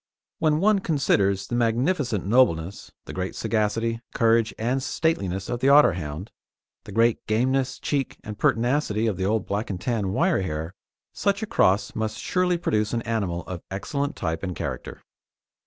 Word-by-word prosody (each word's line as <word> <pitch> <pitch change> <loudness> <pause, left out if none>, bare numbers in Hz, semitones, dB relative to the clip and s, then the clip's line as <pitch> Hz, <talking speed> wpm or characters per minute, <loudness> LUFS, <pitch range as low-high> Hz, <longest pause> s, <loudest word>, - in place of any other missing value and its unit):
When 155 -1 +2
one 205 +2 +4
considers 100 - +1
the - - -7
magnificent 120 - +1
nobleness, 100 -6 +2
the - - -8
great 95 0 -4
sagacity, 115 +1 -1
courage, 115 -1 +3
and 125 +4 0
stateliness 100 - -1
of 120 - -3
the 130 - +1
Otterhound, 90 - +3 0.6
the - - -9
great 115 +2 +2
gameness, 130 +4 +1
cheek, 140 -3 -2
and 105 - -6
pertinacity 115 -2 +1
of 110 -4 0
the 95 - -1
old 105 0 0
Black 105 +2 -2
and 95 -3 -3
Tan 100 -1 -1
wire 95 - +2
hair, 80 -1 -4 0.4
such 200 +1 0
a - - 0
cross 100 - +2
must 110 -1 -3
surely 180 -1 +1
produce 110 -10 0
an 115 -1 -1
animal 100 -7 -2
of 90 -1 -7
excellent 140 +9 -3
type 80 -2 -3
and 90 -2 -4
character. - - -6
110 Hz, 160 wpm, -25 LUFS, 95-130 Hz, 0.6 s, one